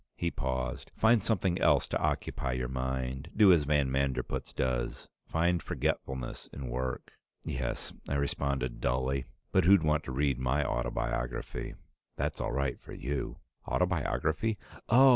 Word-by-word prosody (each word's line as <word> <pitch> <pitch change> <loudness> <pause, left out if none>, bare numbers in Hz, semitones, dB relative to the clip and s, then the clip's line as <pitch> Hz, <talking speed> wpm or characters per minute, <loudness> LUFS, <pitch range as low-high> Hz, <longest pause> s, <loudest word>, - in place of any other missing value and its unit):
He 85 -1 -1
paused. 65 -1 -2
"Find 110 0 +5
something 95 -4 +1
else 75 -4 +4
to - - +1
occupy 65 - -1
your 65 0 -1
mind. 65 +1 -2
Do 100 -4 +8
as 80 -4 +3
van 70 -2 +2
Manderpootz 70 0 -1
does. 60 -2 -1 0.2
Find 85 +1 +2
forgetfulness 65 -2 -2
in 65 -3 -6
work." 65 +1 -3 0.3
"Yes," - - -3 0.2
I 70 - 0
responded 70 -3 -1
dully. 65 +2 +1 0.3
"But - - +4
who'd 95 -2 +7
want 75 0 +2
to - - -4
read 70 -1 +1
my 65 +3 +1
autobiography? 60 0 -2 0.4
That's - - -2
all - - -1
right 70 0 -1
for - - -10
you." 70 +2 -3 0.3
"Autobiography? 90 +3 +1 0.3
Oh! 130 +4 +8
70 Hz, 145 wpm, -31 LUFS, 65-80 Hz, 0.4 s, Do